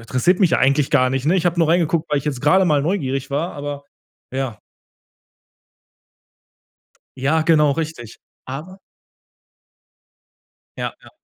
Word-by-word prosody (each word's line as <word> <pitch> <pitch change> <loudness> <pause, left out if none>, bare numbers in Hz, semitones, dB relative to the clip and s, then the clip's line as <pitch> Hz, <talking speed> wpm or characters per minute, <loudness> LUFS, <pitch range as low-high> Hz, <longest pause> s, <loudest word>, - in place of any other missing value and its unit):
interessiert 130 - +1
mich 185 -5 +4
ja - - +3
eigentlich 140 +2 +2
gar 130 -4 +4
nicht, 135 0 -2
ne? 165 +5 +3
Ich 180 - +1
hab 175 0 0
nur 165 -2 +2
reingeguckt, 170 -1 +1
weil 145 - +2
ich 140 - -7
jetzt 140 -4 -3
grade 185 +7 +4
mal 150 -4 +2
neugierig 135 -6 -2
war, 150 +6 -2
aber 145 0 -6 0.5
ja. 130 -5 -3 2.6
Ja, 150 +5 +1
genau, 150 -3 +4
richtig. 150 -7 -5 0.3
Aber 155 +9 -8 2.0
Ja, - - -3
ja. - - -16
150 Hz, 140 wpm, -20 LUFS, 135-165 Hz, 2.6 s, mich